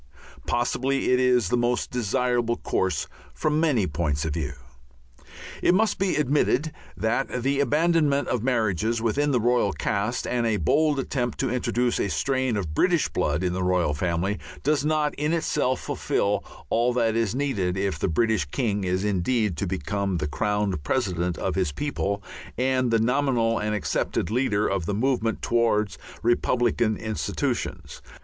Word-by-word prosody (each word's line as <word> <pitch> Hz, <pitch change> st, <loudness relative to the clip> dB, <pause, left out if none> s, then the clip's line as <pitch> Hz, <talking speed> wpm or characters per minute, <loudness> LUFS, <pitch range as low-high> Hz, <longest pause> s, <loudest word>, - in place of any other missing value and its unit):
Possibly 130 Hz, +3 st, 0 dB
that -, -, +1 dB
is 125 Hz, -6 st, +3 dB
the 125 Hz, -, +2 dB
most 120 Hz, 0 st, 0 dB
desirable 120 Hz, 0 st, 0 dB
course 95 Hz, -9 st, -1 dB, 0.3 s
from 155 Hz, 0 st, +1 dB
many 145 Hz, -, +2 dB
points 75 Hz, -2 st, -1 dB
of 80 Hz, -, -2 dB
view. 75 Hz, -3 st, -3 dB, 1.1 s
It 180 Hz, -, +4 dB
must 220 Hz, +3 st, +2 dB
be 195 Hz, -1 st, +1 dB
admitted 150 Hz, +1 st, +1 dB, 0.3 s
that 120 Hz, +2 st, -1 dB
the 140 Hz, +1 st, +1 dB
abandonment 150 Hz, 0 st, +2 dB
of 125 Hz, -, 0 dB
marriages 115 Hz, -3 st, 0 dB
within 125 Hz, +6 st, +1 dB
the 130 Hz, -4 st, +2 dB
royal 120 Hz, -3 st, +2 dB
caste 105 Hz, +5 st, -1 dB
and 120 Hz, -1 st, 0 dB
a 110 Hz, -2 st, +1 dB
bold 150 Hz, +5 st, +2 dB
attempt 125 Hz, -3 st, -2 dB
to 130 Hz, -3 st, 0 dB
introduce 125 Hz, -1 st, 0 dB
a 100 Hz, -, 0 dB
strain 130 Hz, 0 st, 0 dB
of 85 Hz, -7 st, -3 dB
British 175 Hz, -, +2 dB
blood 75 Hz, +5 st, -1 dB
in 90 Hz, -1 st, 0 dB
the 95 Hz, -, -2 dB
royal 90 Hz, -4 st, +1 dB
family 90 Hz, +5 st, -1 dB, 0.2 s
does 145 Hz, -1 st, +2 dB
not 150 Hz, -1 st, +1 dB
in 150 Hz, +2 st, 0 dB
itself 150 Hz, -6 st, 0 dB
fulfil 100 Hz, 0 st, -1 dB, 0.3 s
all 120 Hz, +2 st, +2 dB
that 115 Hz, -2 st, +1 dB
is 115 Hz, -2 st, 0 dB
needed 105 Hz, -10 st, -1 dB
if 95 Hz, 0 st, -1 dB
the -, -, 0 dB
British 110 Hz, -1 st, +1 dB
king 105 Hz, -, -1 dB
is 95 Hz, +1 st, 0 dB
indeed 105 Hz, +1 st, +1 dB
to 100 Hz, -, -2 dB
become 95 Hz, +2 st, -2 dB
the 75 Hz, -, -2 dB
crowned 105 Hz, +2 st, -1 dB
president 90 Hz, -, -1 dB
of -, -, -2 dB
his 90 Hz, -3 st, 0 dB
people 100 Hz, -, -2 dB, 0.3 s
and 130 Hz, 0 st, +1 dB
the 115 Hz, -, +3 dB
nominal 120 Hz, -1 st, +1 dB
and 105 Hz, 0 st, -1 dB
accepted 105 Hz, -, -1 dB
leader 110 Hz, -4 st, +1 dB
of 95 Hz, -4 st, -1 dB
the 105 Hz, -, -1 dB
movement 115 Hz, -1 st, 0 dB
towards 115 Hz, -3 st, +1 dB, 0.2 s
republican 120 Hz, -1 st, +2 dB
institutions. 110 Hz, -10 st, -3 dB
115 Hz, 160 wpm, -25 LUFS, 100-130 Hz, 1.1 s, It